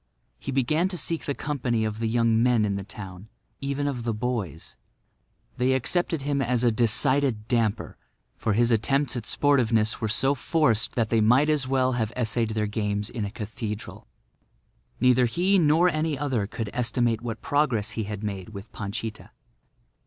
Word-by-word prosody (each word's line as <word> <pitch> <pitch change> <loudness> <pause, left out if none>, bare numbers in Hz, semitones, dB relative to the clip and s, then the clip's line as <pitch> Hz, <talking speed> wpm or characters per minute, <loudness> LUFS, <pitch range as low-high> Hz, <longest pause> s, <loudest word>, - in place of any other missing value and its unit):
He 140 - -5
began 145 +7 +1
to 185 -1 -4
seek 165 -1 -1
the 140 - -2
company 125 -6 -1
of 110 0 -4
the 115 - -1
young 115 0 +2
men 120 -3 +3
in 100 -1 -1
the 100 - -4
town—even 105 +8 -7
of 125 -4 -3
the 115 -2 -1
boys. 105 - -4 0.8
They 130 +1 +2
accepted 150 +4 0
him 140 -1 0
as 125 -1 +1
a 120 - +4
decided 120 +1 +2
damper, 115 -4 -1 0.4
for 110 - -1
his 120 +3 +2
attempts 135 +5 +1
at 120 -3 -4
sportiveness 115 -7 +2
were 110 - -1
so 135 +6 +3
forced 135 -6 +1
that 115 -3 0
they 115 -1 +3
might 125 +8 +4
as 145 -4 0
well 130 -1 +2
have 115 -3 -1
essayed 115 -1 0
their 105 -1 0
games 105 0 -2
in 115 -4 -3
a - - -4
cathedral. 105 0 -6 0.9
Neither 125 0 +4
he 185 +10 +2
nor 160 +2 +4
any 155 -3 0
other 130 -8 -1
could 110 -1 -5
estimate 120 -1 0
what 115 -2 -6
progress 125 -8 +1
he 110 -1 -3
had 105 0 -6
made 100 -2 -4
with 105 0 -10
Panchita. 110 +1 -6
120 Hz, 170 wpm, -25 LUFS, 110-135 Hz, 0.9 s, a